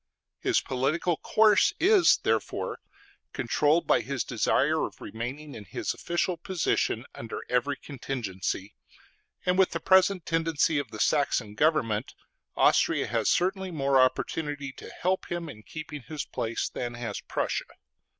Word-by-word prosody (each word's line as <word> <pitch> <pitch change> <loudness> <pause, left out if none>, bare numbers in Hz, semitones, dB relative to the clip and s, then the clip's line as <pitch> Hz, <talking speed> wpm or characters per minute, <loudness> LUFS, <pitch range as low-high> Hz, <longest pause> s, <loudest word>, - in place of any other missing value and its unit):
His - - +2
political 150 +6 0
course 215 -2 +4
is 385 0 +6
therefore - - -1 0.5
controlled 150 +3 +2
by - - +3
his 140 -2 -2
desire - - +1
of - - -5
remaining 135 +6 -6
in 105 - -8
his 95 - -3
official 175 +1 -1
position 165 - -1
under 115 - -6
every 125 +3 +1
contingency; 115 -8 -4 0.7
and 180 +1 +2
with 190 - +5
the 165 - -3
present 190 +1 +4
tendency 165 -2 +1
of 140 -5 -4
the 110 - -9
Saxon 125 -8 +1
government, 115 -5 +1 0.4
Austria - - +3
has - - 0
certainly 190 +1 +1
more 140 -5 +3
opportunity 145 +2 -1
to - - -11
help 185 +1 -1
him 175 -1 -3
in 110 -8 -9
keeping 150 +3 -8
his 150 +2 -5
place 115 0 -2
than 120 -1 -5
has 115 -4 -5
Prussia. - - -2
145 Hz, 140 wpm, -28 LUFS, 120-170 Hz, 0.7 s, is